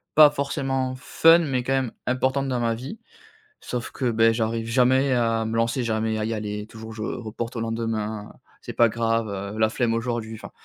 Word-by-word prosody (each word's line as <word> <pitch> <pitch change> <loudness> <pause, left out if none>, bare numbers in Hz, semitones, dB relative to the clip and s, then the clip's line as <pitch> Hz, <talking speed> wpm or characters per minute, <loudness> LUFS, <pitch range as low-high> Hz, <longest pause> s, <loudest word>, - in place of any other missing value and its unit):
pas 150 -1 +9
forcément 135 -2 -2
fun 165 +6 +5
mais 135 -6 -1
quand 135 +2 0
même 130 -3 0
importantes 130 +2 0
dans 125 -1 0
ma 115 -1 0
vie. 130 - -8 0.6
Sauf 120 -1 -5
que, 130 -3 -1
beh, 115 0 +4
j'arrive 115 0 -1
jamais 130 +3 +3
à 115 -2 +1
me 110 - -3
lancer, 115 +3 +1
jamais 110 -1 -1
à 110 - -1
y 115 - -2
aller, 105 -1 -4
toujours 110 0 -10
je 110 - -6
reporte 115 +1 -5
au - - -2
lendemain: 110 -2 -3 0.3
«C'est - - -7
pas 120 -1 +4
grave, 115 0 0
heu, 100 +1 -5
la 110 0 +4
flemme 115 0 0
aujourd'hui» 115 -1 -3
enfin, - - -10
115 Hz, 195 wpm, -24 LUFS, 110-130 Hz, 0.6 s, pas